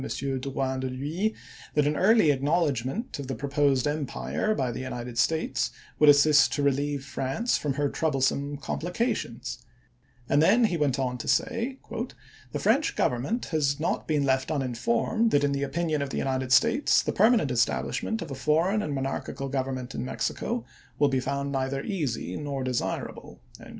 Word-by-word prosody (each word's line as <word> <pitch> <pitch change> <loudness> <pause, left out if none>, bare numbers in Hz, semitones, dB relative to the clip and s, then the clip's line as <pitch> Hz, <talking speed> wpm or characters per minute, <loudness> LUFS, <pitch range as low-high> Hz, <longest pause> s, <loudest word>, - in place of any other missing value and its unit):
Drouyn 135 -1 -2
de 130 - -2
l'Huys 155 +12 -2 0.4
that 150 -1 +3
an 150 +1 +1
early 195 -4 +5
acknowledgment 145 - -1
of 140 - -5
the 135 - -3
proposed 140 0 +1
empire 150 +8 -1
by 130 -8 -1
the 120 - -5
United 125 -2 -5
States 135 -5 +1 0.3
would 150 - +7
assist 145 -1 +6
to 145 - -1
relieve 140 0 0
France 140 - -1
from 140 -3 -2
her 145 +1 +1
troublesome 140 -1 0
com 140 - -4
plications; 155 - -2 0.7
and 145 - +3
then 230 +9 +5 0.2
went 140 -3 +1
on 125 -2 -2
to - - -6
say, 255 0 0 0.4
" - - -24
the - - -2
French 295 +2 +2
Government 140 - 0
has 140 -2 +1
not 160 - -1
been 150 -2 +1
left 130 -1 +1
uninformed 135 - 0
that, 145 -8 +3
in 145 - +2
the 140 0 -1
opinion 155 +2 -1
of 140 - -2
the - - -4
United 130 -1 -1
States, 230 - +4
the - - -2
permanent 215 - +4
establishment 125 - 0
of - - -9
a - - -3
foreign 165 +10 +1
and 150 -7 -3
monarchical 135 0 -3
govern 135 -1 -1
ment 130 +1 -6
in - - -3
Mexico 230 - -2 0.3
will 145 -1 +4
be 135 -1 +1
found 140 +2 -2
neither 135 0 -1
easy 140 - -3
nor 140 -3 -3
de 130 - -1
sirable." 125 - -4
140 Hz, 170 wpm, -27 LUFS, 130-160 Hz, 0.7 s, would